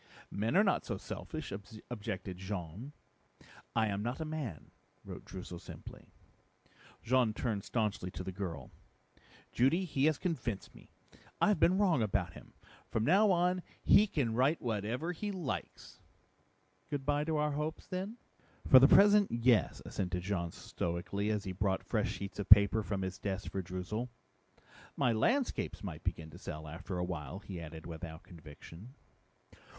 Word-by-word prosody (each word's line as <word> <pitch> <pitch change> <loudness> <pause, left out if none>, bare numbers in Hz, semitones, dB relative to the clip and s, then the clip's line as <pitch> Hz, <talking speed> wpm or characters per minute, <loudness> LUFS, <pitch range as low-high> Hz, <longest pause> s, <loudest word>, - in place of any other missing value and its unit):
"Men 110 - +1
are 205 - +7
not 195 - +2
so - - -3
selfish," 155 -3 -6 0.4
objected 95 -5 -4
Jean. 95 - -5 0.8
"I 115 -1 +4
am 100 -1 -1
not 120 +6 -3
a 160 - -2
man," 150 - -5 0.3
wrote - - -8
Droozle 90 -2 -8
simply. - - -11 1.0
Jean 125 -3 +3
turned 110 -6 -1
staunchly 105 -5 -1
to 90 - -6
the 95 - -4
girl. 90 -8 -5 0.8
"Judy, 160 +10 +3
he 140 -4 +1
has 155 -2 +3
convinced 125 - -3
me. - - -16 0.5
I - - +4
have 210 - +2
been 185 +2 +5
wrong 185 - +3
about 100 -5 0
him. - - -13 0.4
From 110 - 0
now 195 - +5
on 180 0 +3 0.2
he 210 - +6
can 135 - 0
write 135 +7 +3
whatever 115 - -2
he 205 +4 -3
likes!" 175 - -5 0.9
"Good 145 -3 -3
by 145 0 +2
to 160 -1 0
our 150 0 +1
hopes 150 +2 -3
then?" 190 +5 -4 0.5
"For 130 - +10
the 135 - +8
present, 205 +3 +7
yes," 120 -1 +2
assented 90 -1 -2
Jean 90 -3 -1
stoically, 85 +5 -3
as 105 -2 0
he 95 - -4
brought 95 +1 0
fresh 110 -3 0
sheets 100 0 -6
of 100 - -4
paper 105 +1 +8
from 100 -2 -2
his 95 0 -4
desk 100 0 -3
for 95 - -2
Droozle. 95 +7 -4 0.9
"My 125 - +3
landscapes 240 - 0
might 85 -5 -6
begin 80 -3 -3
to - - -11
sell 75 0 -6
after 90 +4 -5
a 90 - 0
while," 80 -3 -5
he 95 -4 -7
added 80 0 -8
without 80 -1 -7
conviction. 85 - -12
110 Hz, 160 wpm, -33 LUFS, 90-150 Hz, 1.0 s, For